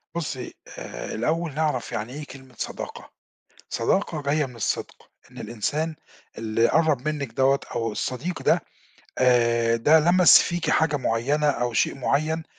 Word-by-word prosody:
بُصّي، 140 Hz, -7 st, -4 dB, 0.2 s
آآ، -, -, -7 dB
الأول 160 Hz, +7 st, -1 dB
نعرَف 150 Hz, -4 st, -1 dB
يعني 115 Hz, +4 st, -4 dB
إيه 150 Hz, 0 st, -6 dB
كلمة 130 Hz, -1 st, -14 dB
صداقة، -, -, -6 dB, 0.6 s
صداقة 155 Hz, -, 0 dB
جاية 145 Hz, +1 st, +1 dB
من 125 Hz, -2 st, -13 dB
الصدق 115 Hz, -, -4 dB, 0.2 s
إن -, -, -13 dB
الإنسان 145 Hz, +9 st, -2 dB, 0.4 s
اللي 115 Hz, +1 st, +1 dB
قرَّب 155 Hz, -4 st, +2 dB
منِّك 140 Hz, -6 st, -3 dB
دَوَّة 135 Hz, +3 st, +2 dB
أو 115 Hz, -2 st, -1 dB
الصديق 130 Hz, +11 st, -4 dB
ده، -, -, +3 dB, 0.6 s
آآ، 115 Hz, -2 st, +3 dB
ده 150 Hz, +7 st, +5 dB
لمَس 175 Hz, +3 st, +7 dB
فيكِ 175 Hz, -1 st, -2 dB
حاجة 150 Hz, -2 st, +2 dB
معيّنة 140 Hz, +5 st, 0 dB
أو 120 Hz, -4 st, 0 dB
شيء -, -, +1 dB
معيّن 155 Hz, +5 st, 0 dB
140 Hz, 145 wpm, -24 LUFS, 120-155 Hz, 0.6 s, لمَس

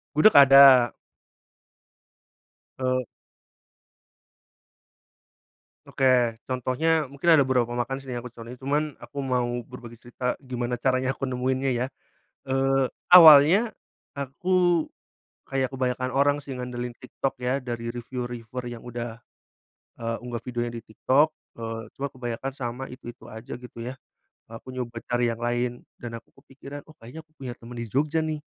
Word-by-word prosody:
Gudeg 180 Hz, +6 st, +6 dB
ada. 135 Hz, -3 st, +9 dB, 1.9 s
Eee. 130 Hz, -1 st, 0 dB, 2.8 s
Oke, 125 Hz, -4 st, +2 dB
contohnya 130 Hz, +4 st, 0 dB
mungkin 140 Hz, +5 st, +3 dB
ada 155 Hz, -, +6 dB
beberapa 125 Hz, -3 st, +1 dB
makan 120 Hz, +2 st, -2 dB
sini 135 Hz, -2 st, -8 dB
yang 120 Hz, -, -4 dB
aku 125 Hz, -, -8 dB
contohin 115 Hz, +1 st, -10 dB
cuman 145 Hz, +2 st, -1 dB
aku -, -, -12 dB
mau 125 Hz, -2 st, 0 dB, 0.2 s
berbagi 120 Hz, -2 st, -11 dB
cerita 125 Hz, +1 st, -4 dB
gimana 125 Hz, -2 st, -4 dB
caranya 130 Hz, +1 st, +1 dB
aku 135 Hz, -, -2 dB
nemuinnya 130 Hz, +1 st, -1 dB
ya. 120 Hz, +1 st, 0 dB, 0.6 s
Eee, 135 Hz, 0 st, +2 dB, 0.2 s
awalnya 175 Hz, +5 st, +9 dB, 0.4 s
aku 175 Hz, +4 st, +1 dB, 0.6 s
kayak 135 Hz, -1 st, -1 dB
kebanyakan 130 Hz, -1 st, -2 dB
orang 145 Hz, +2 st, +3 dB
sih, 140 Hz, -, -8 dB
ngandelin 125 Hz, -1 st, -5 dB
TikTok 135 Hz, +1 st, -4 dB
ya 125 Hz, +2 st, -1 dB
dari 120 Hz, -1 st, -5 dB
reviu 125 Hz, +1 st, -5 dB
reviewer 120 Hz, +1 st, -7 dB
yang 120 Hz, -1 st, -8 dB
udah, 120 Hz, -1 st, -7 dB, 0.7 s
eee, 115 Hz, 0 st, -3 dB
unggah 120 Hz, -2 st, -6 dB
videonya 120 Hz, -1 st, -3 dB
di 115 Hz, -, -7 dB
TikTok, 145 Hz, +7 st, +3 dB, 0.2 s
eee, 115 Hz, 0 st, -5 dB
cuma 140 Hz, -, -3 dB
kebanyakan 125 Hz, +1 st, -5 dB
sama 130 Hz, -1 st, -5 dB
itu-itu 120 Hz, -2 st, -11 dB
aja 110 Hz, +2 st, -9 dB
gitu 125 Hz, -1 st, -13 dB
ya, 130 Hz, -, -7 dB, 0.5 s
aku 115 Hz, +3 st, -10 dB
nyoba 120 Hz, -2 st, -5 dB
cari 120 Hz, -1 st, +1 dB
yang 115 Hz, -, -5 dB
lain 120 Hz, +1 st, -2 dB, 0.2 s
dan 115 Hz, -1 st, -5 dB
aku -, -, -24 dB
kepikiran, 140 Hz, +1 st, -10 dB
oh 155 Hz, -, -16 dB
kayaknya 125 Hz, +8 st, -10 dB
aku 155 Hz, -, -44 dB
punya 125 Hz, -3 st, -6 dB
temen 120 Hz, +1 st, -11 dB
di 115 Hz, -, -4 dB
Jogja 145 Hz, +7 st, 0 dB
nih, 155 Hz, -1 st, -4 dB
125 Hz, 140 wpm, -25 LUFS, 120-135 Hz, 2.8 s, ada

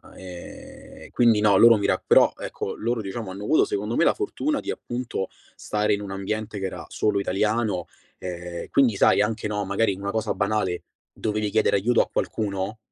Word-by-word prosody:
ehm, 90 Hz, -2 st, -11 dB
quindi 115 Hz, -3 st, +4 dB
no, 105 Hz, -2 st, +5 dB
loro 115 Hz, +2 st, +8 dB
mi 100 Hz, -, 0 dB
ra -, -, +2 dB
però, -, -, +6 dB
ecco, -, -, -5 dB
loro 115 Hz, 0 st, -1 dB
diciamo 100 Hz, 0 st, -5 dB
hanno 100 Hz, +2 st, -7 dB
avuto 155 Hz, -, +4 dB
secondo 105 Hz, +3 st, -2 dB
me -, -, +3 dB
la -, -, +4 dB
fortuna 305 Hz, -8 st, -2 dB
di, -, -, -7 dB
appunto, 120 Hz, -5 st, -4 dB, 0.3 s
stare 105 Hz, 0 st, 0 dB
in 100 Hz, -, -7 dB
un 100 Hz, -2 st, -6 dB
ambiente 105 Hz, +2 st, -4 dB
che 95 Hz, -, -3 dB
era -, -, -7 dB
solo 105 Hz, -2 st, 0 dB
italiano, 105 Hz, -1 st, 0 dB, 0.3 s
ehm, 90 Hz, -1 st, -6 dB
quindi 125 Hz, -6 st, +3 dB
sai 100 Hz, -, +4 dB
anche, 110 Hz, 0 st, -2 dB
no, 105 Hz, -1 st, -2 dB
magari 100 Hz, 0 st, +1 dB
una 100 Hz, +1 st, -4 dB
cosa 110 Hz, 0 st, -1 dB
banale: 100 Hz, -4 st, -1 dB, 0.3 s
dovevi 105 Hz, -1 st, -2 dB
chiedere 105 Hz, 0 st, +2 dB
aiuto 115 Hz, +5 st, +3 dB
a -, -, -11 dB
qualcuno, 100 Hz, 0 st, -2 dB
105 Hz, 185 wpm, -24 LUFS, 95-110 Hz, 0.3 s, loro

